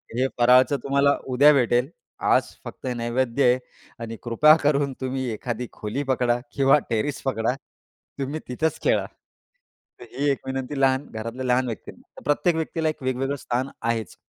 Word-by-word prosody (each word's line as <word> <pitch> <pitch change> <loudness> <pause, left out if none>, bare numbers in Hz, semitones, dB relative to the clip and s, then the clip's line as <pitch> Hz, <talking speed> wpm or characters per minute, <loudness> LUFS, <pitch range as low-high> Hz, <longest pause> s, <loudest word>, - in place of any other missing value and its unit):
हे 130 +2 +2
फराळाचं 125 +3 +5
तुम्हाला 140 +1 +3
उद्या 145 +4 +6
भेटेल. 125 0 +2 0.3
आज - - +3 0.2
फक्त - - -9
हे 125 - -1
नैवेद्य 120 +2 0
आहे 125 +1 +4 0.4
आणि 115 0 -6
कृपा 150 +6 +6
करून 140 -2 +2
तुम्ही 130 0 -2
एखादी 120 +2 -4
खोली 110 +7 -4
पकडा 125 -3 +1 0.2
किंवा 135 +1 +5
टेरिस 135 +5 -1
पकडा. 120 -2 0 0.7
तुम्ही 140 +3 -3
तिथंच 160 +6 -1
खेळा. - - +2 0.9
तर 120 - -10
ही 140 +3 0
एक 135 - -2
विनंती 135 +1 -3
लहान 135 +1 +2
घरातल्या 115 +4 -5
लहान 125 +1 +2
व्यक्तींना. 110 -6 -9
प्रत्येक 150 +3 +2
व्यक्तीला 160 0 -1
एक 155 -3 -6
वेगवेगळं 130 +2 -1
स्थान 130 +3 -1
आहेच. 115 -4 -2
130 Hz, 155 wpm, -24 LUFS, 120-140 Hz, 0.9 s, उद्या